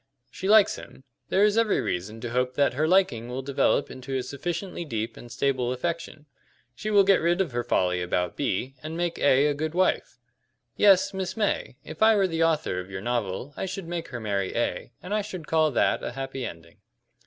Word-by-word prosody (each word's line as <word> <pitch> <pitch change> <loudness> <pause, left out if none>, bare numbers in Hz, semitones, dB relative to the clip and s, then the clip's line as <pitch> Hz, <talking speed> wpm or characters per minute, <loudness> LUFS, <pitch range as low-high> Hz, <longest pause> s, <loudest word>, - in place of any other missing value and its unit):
She 190 - -4
likes 215 -1 +6
him. 130 - -12 0.3
There 195 - +3
is 210 +1 +4
every 225 -2 +2
reason 105 +6 -3
to 120 - -5
hope 125 +1 0
that 140 -1 +2
her 150 +5 +1
liking 160 -11 +2
will 130 +2 -4
develop 140 +1 +1
into 130 +1 -4
a 130 - -2
sufficiently 175 +7 -4
deep 115 -6 -4
and 120 - -12
stable 125 -1 0
affection. 160 +2 -4 0.5
She 215 - -5
will 205 -2 +6
get 195 0 +4
rid 170 +2 +2
of 185 -7 0
her 120 0 -2
folly 90 -4 +1
about 90 0 -1
B, 130 -1 -2
and 155 +2 -6
make 175 -1 -2
A 140 0 +4
a 150 - +2
good 155 +3 -3
wife. 185 0 +1 0.6
Yes, 195 -1 +5
Miss 190 +2 -4
May, 205 - -1
if 155 +4 -10
I 220 0 +6
were 200 -2 +3
the 165 -2 0
author 155 - +1
of 90 +1 -7
your 95 -1 -6
novel 120 +3 -2
I - - -3
should 190 -2 -6
make 170 -1 -4
her 120 - -6
marry 100 -3 -2
A, 120 0 -2
and 185 - -4
I 210 - +2
should 185 -5 -7
call 155 0 +3
that 135 - +1
a - - -5
happy 135 -1 -4
ending." 85 0 -12
145 Hz, 210 wpm, -26 LUFS, 120-180 Hz, 0.6 s, likes